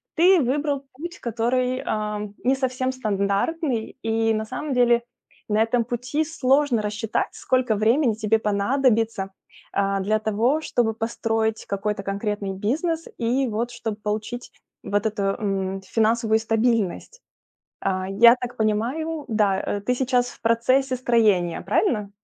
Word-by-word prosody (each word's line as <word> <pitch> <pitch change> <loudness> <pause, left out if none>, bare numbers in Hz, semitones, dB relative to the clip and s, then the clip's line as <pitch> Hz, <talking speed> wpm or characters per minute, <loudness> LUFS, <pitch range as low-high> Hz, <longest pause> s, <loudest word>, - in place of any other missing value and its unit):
Ты 360 +2 +6
выбрал 280 +2 0
путь, 345 +6 -7
который, 250 +2 0
а, 210 -1 -2 0.2
не 260 +2 +3
совсем 260 -1 -1
стандартный 220 +4 -1
и, 225 0 +1
на 220 0 -2
самом 260 +5 -4
деле, 240 -1 +4 0.5
на 210 +1 +2
этом 230 +1 +2
пути 245 +6 -2
сложно 285 -5 +2
рассчитать, 210 +1 -1
сколько 255 -4 0
времени 230 +4 +3
тебе 220 0 +1
понадобится, 220 -1 +1 0.4
а, 195 0 +1
для 215 +3 +1
того, 225 +8 +1
чтобы 235 -7 0
построить 225 0 -1
какой-то 200 +1 -2
конкретный 200 0 -3
бизнес, 315 - -1
и, 250 +3 +1
вот, 225 +3 -2
чтобы 230 -3 -4
получить, 215 +3 -4 0.3
вот 205 +1 -1
эту, 215 -2 -1
м, 195 -1 -1
финансовую 220 +2 +2
стабильность. 225 - 0 0.6
А, 185 -1 -1
я 235 +5 +7
так 250 0 -7
понимаю, 260 +9 -1
да, 210 -4 +2
э, 205 - -3
ты 250 +5 0
сейчас 250 -1 +1
в - - -15
процессе 255 +4 +2
строения, 215 -9 +2
правильно? 210 - 0
225 Hz, 135 wpm, -23 LUFS, 210-255 Hz, 0.6 s, я